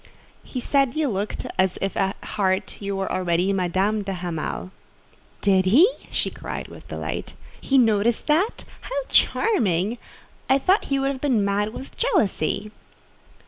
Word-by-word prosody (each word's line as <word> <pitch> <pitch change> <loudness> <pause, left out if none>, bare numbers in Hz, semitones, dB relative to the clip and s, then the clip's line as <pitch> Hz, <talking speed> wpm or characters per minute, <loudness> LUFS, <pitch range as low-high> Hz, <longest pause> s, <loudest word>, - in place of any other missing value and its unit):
"He 255 - -5
said 275 +1 +1
you 310 -2 +1
looked 205 0 -3
as 185 -1 +2
if 195 - -2
at 195 0 0
heart 190 -2 -1
you 200 0 -2
were 195 0 -2
already 180 +1 +1
Madame 190 +3 +1
de 195 -1 -3
Hamal." 175 0 -4 0.7
"Did 190 -2 +3
he?" 265 - +7 0.2
she - - -1
cried - - -6
with - - -13
delight. - - -5 0.3
"He 270 - +2
noticed 225 -1 +3
that? 340 +10 +1 0.2
How - - -6
charming! 220 - +2 0.5
I 265 - +6
thought 375 +9 +2
he 275 - 0
would 270 -1 -1
be 290 - 0
mad 205 -2 +1
with 265 +4 -9
jealousy. 215 - 0
210 Hz, 145 wpm, -24 LUFS, 190-270 Hz, 0.7 s, he